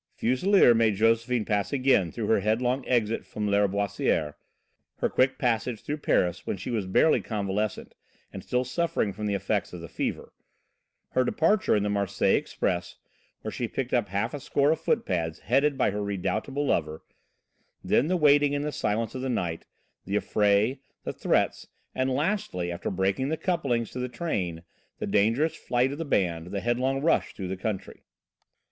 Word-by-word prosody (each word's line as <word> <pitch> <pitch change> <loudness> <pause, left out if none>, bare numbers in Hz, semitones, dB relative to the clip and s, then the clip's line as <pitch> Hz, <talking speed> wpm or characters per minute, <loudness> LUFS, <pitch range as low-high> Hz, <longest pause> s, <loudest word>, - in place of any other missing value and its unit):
Fuselier 130 - +4
made 115 -2 +3
Josephine 115 +2 +2
pass 100 -2 0
again 130 - +2
through 115 - -4
her 110 - +3
headlong 120 +6 0
exit 115 -3 +1
from 105 - -5
Lâriboisière, 100 -6 +1 0.6
her - - 0
quick 130 +1 +2
passage 120 -3 -1
through 150 - -3
Paris 90 - 0
when - - -2
she 95 +7 -5
was 105 -5 -1
barely 155 +11 +4
convalescent, 105 -1 -3 0.4
and - - -6
still 125 0 0
suffering 130 - -1
from 105 +2 -4
the 100 - 0
effects 100 +1 -1
of 90 - -6
the 85 - -8
fever, - - -4 0.8
her 130 - +2
departure 165 - +2
in 105 - +1
the 105 - 0
Marseilles 100 -2 +1
Express, 90 -1 -3 0.5
where - - -4
she - - -3
picked - - -4
up - - +1
half 100 +7 -1
a 145 - -4
score 140 +1 +2
of 160 - -1
footpads 90 - -1
headed 140 +4 +2
by 125 - +2
her 105 +1 -3
redoubtable 100 +8 -2
lover; 80 - -1 0.8
then 145 - +2
the 180 +2 +1
waiting 145 -2 +4
in 145 0 -1
the 150 - -2
silence 110 -3 -1
of 130 - -5
the 130 - -2
night, 85 -9 -2 0.4
the 100 - -2
affray, 105 +5 +2 0.2
the - - -4
threats, - - 0 0.3
and 130 0 0
lastly, 130 - -1
after 85 - -4
breaking 95 +7 0
the 160 - -1
couplings 135 - -1
to 125 - -6
the 125 0 -2
train, 95 - -3 0.3
the - - -3
dangerous 115 +10 +2
flight 125 -1 0
of 145 - -6
the 165 - -2
band, 85 - 0
the 100 +1 -4
headlong 130 +3 0
rush 165 - +1
through 95 - -5
the 95 - -3
country. 95 +1 -5
115 Hz, 175 wpm, -27 LUFS, 100-135 Hz, 0.8 s, Fuselier